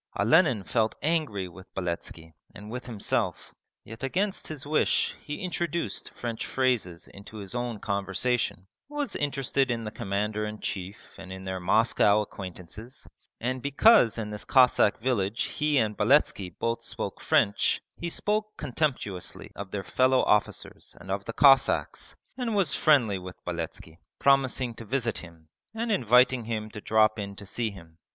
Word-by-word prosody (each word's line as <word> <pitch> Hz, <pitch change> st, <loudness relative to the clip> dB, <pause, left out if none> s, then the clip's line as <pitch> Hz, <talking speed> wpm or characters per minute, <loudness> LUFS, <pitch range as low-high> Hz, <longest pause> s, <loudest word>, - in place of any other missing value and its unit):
Olenin 120 Hz, -, +4 dB
felt 110 Hz, +2 st, 0 dB
angry 150 Hz, -, 0 dB
with 95 Hz, +2 st, -14 dB
Beletski 85 Hz, -2 st, -4 dB, 0.2 s
and 105 Hz, +1 st, -9 dB
with 125 Hz, +1 st, -6 dB
himself, 110 Hz, -5 st, -2 dB, 0.3 s
yet 115 Hz, +1 st, -11 dB
against 190 Hz, +9 st, -1 dB
his 150 Hz, -3 st, -6 dB
wish 150 Hz, +1 st, +1 dB
he 150 Hz, +6 st, -6 dB
introduced 170 Hz, -1 st, -2 dB
French 115 Hz, -2 st, -5 dB
phrases 120 Hz, -10 st, -1 dB
into 100 Hz, +2 st, -12 dB
his 100 Hz, 0 st, -7 dB
own 120 Hz, -3 st, -3 dB
conversation, 100 Hz, +1 st, -1 dB, 0.2 s
was 295 Hz, -3 st, -3 dB
interested 135 Hz, -2 st, 0 dB
in 115 Hz, -2 st, -1 dB
the 105 Hz, -, -5 dB
Commander 105 Hz, -1 st, -2 dB
in 105 Hz, 0 st, -5 dB
Chief 95 Hz, +1 st, -4 dB, 0.2 s
and 95 Hz, -1 st, -9 dB
in 95 Hz, 0 st, -7 dB
their 95 Hz, 0 st, -4 dB
Moscow 105 Hz, +2 st, +3 dB
acquaintances, 100 Hz, +4 st, -9 dB, 0.3 s
and 130 Hz, +2 st, -2 dB
because 140 Hz, -, +5 dB
in 105 Hz, -2 st, -4 dB
this 105 Hz, -, -5 dB
Cossack 125 Hz, -5 st, +4 dB
village 115 Hz, -3 st, 0 dB
he 150 Hz, -1 st, 0 dB
and 110 Hz, -4 st, +1 dB
Beletski 105 Hz, -5 st, +3 dB
both 115 Hz, 0 st, -1 dB
spoke -, -, -5 dB
French, 100 Hz, -, +2 dB, 0.2 s
he 170 Hz, -, -4 dB
spoke 215 Hz, +4 st, -1 dB
contemptuously 125 Hz, -, -3 dB
of 100 Hz, -1 st, -7 dB
their 100 Hz, -1 st, -4 dB
fellow 130 Hz, +3 st, +3 dB
officers 105 Hz, -3 st, -1 dB
and 95 Hz, -, -8 dB
of 100 Hz, 0 st, -2 dB
the 115 Hz, -, -4 dB
Cossacks, 135 Hz, 0 st, +3 dB, 0.2 s
and 240 Hz, -4 st, -2 dB
was 185 Hz, -9 st, +2 dB
friendly 120 Hz, -11 st, +3 dB
with 90 Hz, 0 st, -9 dB
Beletski, 85 Hz, -1 st, -5 dB, 0.2 s
promising 130 Hz, -3 st, +2 dB
to 115 Hz, -, -9 dB
visit 120 Hz, 0 st, -1 dB
him 85 Hz, -2 st, -14 dB, 0.3 s
and 230 Hz, +1 st, -2 dB
inviting 125 Hz, -, +4 dB
him 110 Hz, -1 st, -4 dB
to 105 Hz, -, -8 dB
drop 110 Hz, 0 st, +3 dB
in 100 Hz, -1 st, -5 dB
to 100 Hz, -, -10 dB
see 115 Hz, +3 st, -2 dB
him. 85 Hz, -5 st, -14 dB
115 Hz, 155 wpm, -27 LUFS, 100-135 Hz, 0.3 s, because